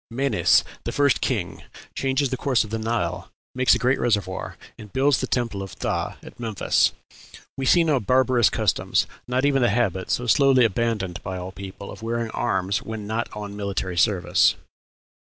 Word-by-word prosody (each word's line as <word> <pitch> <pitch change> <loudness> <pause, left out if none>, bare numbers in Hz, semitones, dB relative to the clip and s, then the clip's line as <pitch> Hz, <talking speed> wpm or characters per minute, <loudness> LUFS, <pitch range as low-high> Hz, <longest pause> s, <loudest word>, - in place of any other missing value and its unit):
Menes, 135 +4 +3 0.2
the - - -3
first 145 -2 +2
king, 110 -9 -2 0.3
changes 135 0 0
the - - 0
course 130 -2 +1
of 110 - -10
the 110 - -2
Nile, 90 -7 -2 0.2
makes 130 0 +4
a - - +1
great 130 +2 +1
reservoir, 100 -5 -1 0.2
and 105 -2 -12
builds 135 -2 +2
the 130 - -2
temple 115 -6 -1
of 95 - -8
Phthah - - -2
at - - -13
Memphis.... 110 -4 +1 0.6
We 135 -1 -3
see 175 +4 +5
no 150 -5 +2
barbarous 125 0 +3
customs, 110 -4 +1 0.2
not 125 +2 0
even 140 -2 +2
the 120 - +4
habit, 100 -4 0
so 125 - 0
slowly 130 0 +5
abandoned 105 -4 -1
by 95 -1 -5
all 90 +1 -6
people, 100 +1 -9
of - - -11
wearing 115 0 -2
arms 95 +3 -1
when 110 -3 -6
not 110 +3 -2
on 105 -1 -7
military 100 -3 -3
service." 95 +1 +3
115 Hz, 175 wpm, -23 LUFS, 100-130 Hz, 0.6 s, see